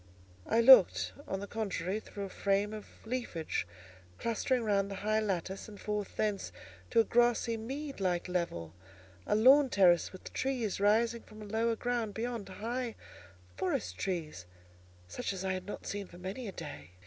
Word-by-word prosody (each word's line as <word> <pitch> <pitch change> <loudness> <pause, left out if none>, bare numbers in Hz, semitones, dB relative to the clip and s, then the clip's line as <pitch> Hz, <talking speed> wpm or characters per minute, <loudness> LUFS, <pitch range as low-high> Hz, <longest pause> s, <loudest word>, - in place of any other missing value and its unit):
I 230 - +3
looked, 95 - +7
on 190 0 -3
the - - -4
contrary, 200 -3 -2
through 205 -2 -7
a 195 - -5
frame 200 +2 0
of 215 -1 -7 0.2
leafage, 200 - -2 0.5
clustering 235 +2 0
round 200 -2 +1
the 195 - -5
high 215 0 +3
lattice, 190 -2 -2
and 205 -2 -11
forth 210 -1 -3
thence 205 - -1 0.4
to 230 - +5
a - - +2
grassy 240 0 +2
mead 270 +5 -5
like 180 -2 0
level, 170 - -2 0.5
a - - +2
lawn 265 +5 +7
terrace 180 -6 +4
with 185 - -11
trees 250 -7 -1
rising 225 +3 +3
from 215 - -15
the 215 - -8
lower 230 +1 +2
ground 235 -3 -2
beyond—high 235 +1 -3 0.6
forest 90 0 -1
trees, 155 - -3 0.6
such 90 - -3
as 190 0 -5
I 190 - +1
had 185 0 -5
not 205 - -6
seen 200 -1 -4
for 175 - -13
many 195 +7 -5
a - - -4
day. 75 - -9
205 Hz, 165 wpm, -32 LUFS, 185-230 Hz, 0.6 s, looked